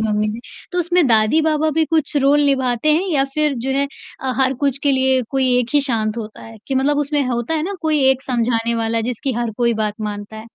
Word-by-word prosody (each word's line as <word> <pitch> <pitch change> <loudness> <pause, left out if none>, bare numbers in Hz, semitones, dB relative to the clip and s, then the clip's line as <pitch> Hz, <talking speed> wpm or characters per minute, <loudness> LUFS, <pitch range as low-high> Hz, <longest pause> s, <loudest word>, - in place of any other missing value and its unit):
Mummy 215 -1 0
में, 220 +2 -5 0.3
तो 360 - -1
उसमें 350 -1 +2
दादी-बाबा 305 +7 +2
भी 320 +1 +1
कुछ 315 -2 -1
रोल 285 +1 +4
निभाते 265 +1 +1
हैं 340 +5 +1
या 275 -2 +2
फ़िर 300 -2 +1
जो - - 0
है, 280 +1 +1 0.6
हर 265 0 +1
कुछ 280 -1 +1
के 285 -1 +3
लिए 260 0 +2
कोई 265 -2 +1
एक 245 +3 -3
ही 290 - +5
शांत 220 -3 -1
होता 215 -2 -7
है 225 0 -11
कि 270 - -2
मतलब 285 +2 +1
उसमें 295 0 0
होता 240 +5 -2
है 310 - -1
ना 395 +5 -3
कोई 310 -2 +1
एक 265 0 0
समझाने 235 -2 0
वाला 230 0 -1
जिसकी 260 +3 -3
हर 235 -1 -1
कोई 235 -1 +1
बात 215 -1 -2
मानता 210 0 -5
है? 220 - -9
265 Hz, 230 wpm, -19 LUFS, 230-295 Hz, 0.6 s, ही